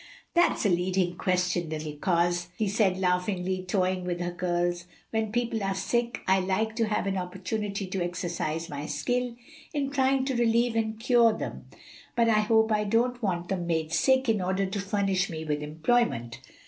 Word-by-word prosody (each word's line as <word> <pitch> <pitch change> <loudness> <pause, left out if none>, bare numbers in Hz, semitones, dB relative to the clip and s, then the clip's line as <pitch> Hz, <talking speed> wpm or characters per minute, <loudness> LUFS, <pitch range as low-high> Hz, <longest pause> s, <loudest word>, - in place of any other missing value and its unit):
"That's 345 -8 +3
a - - +4
leading 180 0 +1
question, 180 -2 0
little 155 -1 -4
coz," 175 +2 +1
he 215 - 0
said 195 -2 +2
laughingly, 185 0 0
toying 185 0 0
with 175 -1 -2
her 175 0 -2
curls. 175 0 -1 0.3
"When 220 -1 -1
people 235 -1 -1
are 195 0 0
sick 235 +5 -1
I 190 +1 +4
like 195 +4 0
to 225 -2 +2
have 210 - 0
an 195 -1 0
opportunity 195 +2 -3
to 185 -1 -2
exercise 175 -2 -3
my 145 -2 -5
skill 250 -1 -1 0.4
in 275 -2 -1
trying 265 -1 +2
to 265 -1 -1
relieve 235 0 +2
and 220 -1 -1
cure 235 -1 +4
them, - - -6 0.5
but 235 -1 +3
I 215 -2 +4
hope 220 +1 +3
I 210 0 +2
don't 240 +4 +1
want 175 -5 -1
them 180 -3 -2
made 160 -1 -1
sick 265 +4 +3
in 220 -4 +2
order 190 +2 0
to 195 +2 -3
furnish 195 -1 0
me 160 -2 -5
with 150 -1 -1
employment." 155 - 0
190 Hz, 180 wpm, -28 LUFS, 175-225 Hz, 0.5 s, a